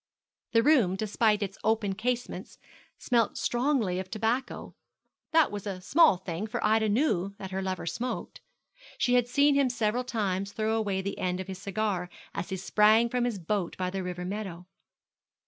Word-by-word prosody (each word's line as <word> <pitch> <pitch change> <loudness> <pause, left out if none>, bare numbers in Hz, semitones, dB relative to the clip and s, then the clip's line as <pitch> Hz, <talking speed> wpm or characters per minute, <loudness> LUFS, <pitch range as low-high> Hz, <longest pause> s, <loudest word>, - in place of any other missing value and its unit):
The 230 0 +5
room, 250 -12 +4
despite 210 +1 +1
its 195 0 -6
open 220 -3 +1
casements, 245 +4 -3 0.4
smelt 235 -3 +1
strongly 240 -7 0
of 185 0 -6
tobacco. 225 +5 -2 0.6
That 325 -1 +4
was 205 0 -5
a 190 -2 -4
small 280 - +5
thing, 185 +2 -5
for 215 - -3
Ida 220 0 +3
knew 205 - +1
that 190 -1 -7
her 190 0 -2
lover 190 -2 -3
smoked. 235 +10 -4 0.6
She 245 - +1
had 245 -1 +4
seen 285 +3 +4
him 280 -2 +3
several 235 0 0
times 200 -4 -2
throw 220 +1 0
away 200 -4 -1
the 200 - -4
end 180 0 -1
of 190 - -4
his 190 -1 -6
cigar 195 -3 -2 0.2
as 180 - -4
he 190 - -3
sprang 215 +4 +4
from 245 0 0
his 240 -4 -1
boat 185 0 -2
by 185 -1 -2
the 195 0 -3
river 180 -1 -5
meadow. 185 -3 -5
210 Hz, 175 wpm, -28 LUFS, 190-235 Hz, 0.6 s, The